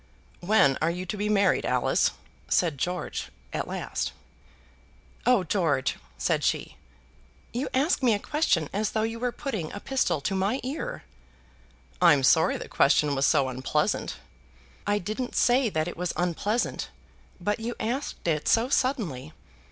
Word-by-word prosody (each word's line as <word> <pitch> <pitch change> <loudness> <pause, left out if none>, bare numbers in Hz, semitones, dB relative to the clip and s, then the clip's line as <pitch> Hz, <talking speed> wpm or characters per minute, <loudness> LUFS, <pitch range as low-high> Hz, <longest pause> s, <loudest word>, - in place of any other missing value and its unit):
"When 175 -8 +3
are 160 - +3
you 180 +2 -3
to 200 - -4
be 210 +1 -1
married, 200 -2 +3
Alice?" - - +2 0.4
said 160 -6 +2
George 180 +4 -3 0.2
at - - -2
last. - - -3 1.1
"Oh, 245 -6 +5
George!" 155 -7 0 0.2
said - - 0
she. - - -1 0.8
"You 250 +4 -2
ask 280 +4 +2
me 240 -4 +4
a - - 0
question 205 - +1
as 210 +1 -1
though 220 - +1
you 225 +1 -3
were 250 0 0
putting 220 - -4
a 205 - -6
pistol 205 - 0
to 145 - -2
my 195 +7 0
ear." 320 - -4 1.0
"I'm 150 -6 +6
sorry 160 +4 +4
the - - -7
question 145 +1 +3
was 135 0 +2
so 140 -4 +3
unpleasant." 130 +8 -1 0.7
"I 205 0 +2
didn't 215 +6 -4
say 245 0 +3
that 155 -4 -1
it 175 - -6
was 180 0 -2
unpleasant; 190 +6 -1 0.5
but 205 +5 -1
you 235 +2 -4
asked 245 -2 -3
it 150 -2 0
so 230 +2 +3
suddenly! 185 - -1
200 Hz, 150 wpm, -27 LUFS, 160-240 Hz, 1.1 s, I'm